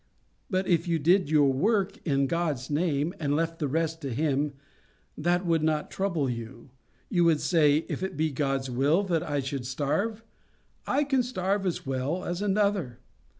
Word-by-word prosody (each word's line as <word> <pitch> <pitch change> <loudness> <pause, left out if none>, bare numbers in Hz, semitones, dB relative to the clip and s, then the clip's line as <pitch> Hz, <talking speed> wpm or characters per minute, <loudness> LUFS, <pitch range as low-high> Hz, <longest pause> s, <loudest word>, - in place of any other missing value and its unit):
But 185 -1 0
if 170 -1 +1
you 170 -1 +2
did 175 +2 +3
your 145 -3 +4
work 200 - +1
in 140 -2 +2
God's 150 -3 -2
name, 155 +1 0
and 145 -2 0
left 165 +1 -1
the 150 - 0
rest 160 +3 -1
to 140 -3 -4
Him, 145 +2 0 0.6
that 175 +4 0
would 165 -2 +2
not 155 -1 0
trouble 170 -8 -1
you. 120 +1 -6 0.4
You 175 -4 +2
would 160 -3 +4
say, 155 -3 +3
If - - -4
it 190 -6 -4
be 155 0 +1
God's 135 -1 -1
will 140 +9 +2
that 170 -5 0
I 145 -2 -1
should 135 -1 -4
starve, 195 - -1 0.6
I 295 - +2
can 270 -3 +2
starve 195 -4 -1
as 175 - -3
well 135 +6 -2
as 175 +2 -3
another. 200 - 0
160 Hz, 175 wpm, -27 LUFS, 140-185 Hz, 0.6 s, your